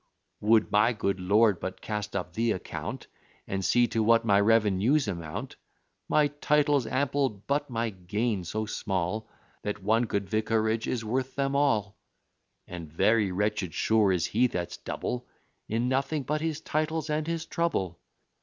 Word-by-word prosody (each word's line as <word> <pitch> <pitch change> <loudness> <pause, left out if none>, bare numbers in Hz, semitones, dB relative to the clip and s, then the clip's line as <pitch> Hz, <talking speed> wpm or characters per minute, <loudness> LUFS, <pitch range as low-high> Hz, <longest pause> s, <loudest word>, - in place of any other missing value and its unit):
"Would 105 -3 +3
my 105 +3 +4
good 100 -3 -1
Lord 100 +1 +3
but 95 0 -5
cast 105 -1 -4
up 90 -2 -3
the 115 +2 +1
account, 95 - -6 0.4
And 95 0 -3
see 120 +5 +4
to 115 - 0
what 115 +1 +4
my 100 -2 +4
revenues 115 +5 +3
amount; 85 -5 -5 0.5
My 150 -1 +4
titles 145 -3 +2
ample; 140 +1 +1
but 140 +8 -3
my 115 -2 -1
gain 100 +2 -2
so 110 +6 -3
small, 100 0 -2 0.3
That 105 -1 -4
one 110 +4 +3
good 100 -3 -2
vicarage 110 +1 0
is 115 -3 -2
worth 130 +3 -2
them 140 0 0
all: 110 -8 +1 0.7
And 85 -4 -8
very 105 +4 +3
wretched, 100 -2 -1
sure, 110 -3 +3
is 85 -3 +1
he 125 +4 +2
that's 90 -7 -4
double 125 0 -4 0.4
In 115 +3 0
nothing 135 +3 0
but 150 +4 -1
his 160 -1 -2
titles 155 0 -1
and 155 +1 -1
his 165 -1 -2
trouble. 95 - -1
110 Hz, 155 wpm, -28 LUFS, 100-130 Hz, 0.7 s, my